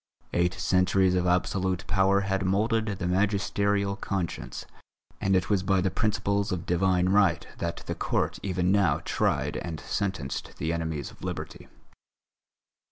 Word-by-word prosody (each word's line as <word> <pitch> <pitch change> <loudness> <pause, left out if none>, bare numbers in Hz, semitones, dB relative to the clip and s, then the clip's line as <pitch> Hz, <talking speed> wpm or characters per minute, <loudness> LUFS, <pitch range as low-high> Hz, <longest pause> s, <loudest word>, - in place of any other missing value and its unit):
Eight 90 +2 +1
centuries 95 0 +2
of 90 0 +1
absolute 90 +1 0
power 95 +1 +3
had 95 -1 -1
moulded 110 +4 +1
the 100 -4 -3
magisterial 100 +1 +1
conscience, 95 -4 -4 0.5
and 95 0 +2
it 95 - +1
was 100 -3 +2
by 95 0 +2
the 95 0 +1
principles 100 -2 0
of 90 -2 -3
Divine 90 +1 +2
Right 95 -4 +3
that - - -3
the - - -2
Court - - -1
even 90 -2 0
now 95 -8 +3
tried - - 0
and 80 -3 -5
sentenced 95 -9 -3
the 80 +1 -1
enemies 80 -4 -3
of - - -17
Liberty. - - -6
95 Hz, 145 wpm, -27 LUFS, 90-100 Hz, 0.5 s, power